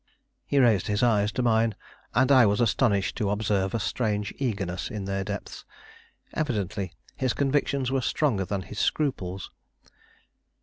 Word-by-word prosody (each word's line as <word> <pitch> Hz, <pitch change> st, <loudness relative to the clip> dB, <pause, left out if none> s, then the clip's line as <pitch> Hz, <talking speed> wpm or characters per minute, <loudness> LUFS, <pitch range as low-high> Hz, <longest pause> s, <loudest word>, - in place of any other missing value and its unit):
He 145 Hz, -, 0 dB
raised 115 Hz, -8 st, +4 dB
his 105 Hz, +2 st, 0 dB
eyes 105 Hz, -3 st, +3 dB
to 125 Hz, -, -1 dB
mine, 115 Hz, -2 st, +2 dB, 0.4 s
and 130 Hz, +2 st, +4 dB
I 130 Hz, -5 st, +7 dB
was 105 Hz, +2 st, +1 dB
astonished 110 Hz, -3 st, +2 dB
to 105 Hz, -, 0 dB
observe 100 Hz, -1 st, 0 dB
a -, -, 0 dB
strange 105 Hz, -2 st, -1 dB
eagerness 100 Hz, -9 st, -2 dB
in 105 Hz, -3 st, -5 dB
their 95 Hz, 0 st, -2 dB
depths; 100 Hz, +1 st, -6 dB, 0.7 s
evidently 105 Hz, -, -2 dB, 0.2 s
his 130 Hz, -3 st, 0 dB
convictions 140 Hz, -2 st, 0 dB
were 135 Hz, -1 st, +1 dB
stronger 120 Hz, -6 st, +1 dB
than 95 Hz, 0 st, -3 dB
his 105 Hz, +3 st, -7 dB
scruples. 95 Hz, -11 st, -1 dB
105 Hz, 145 wpm, -26 LUFS, 100-125 Hz, 0.7 s, I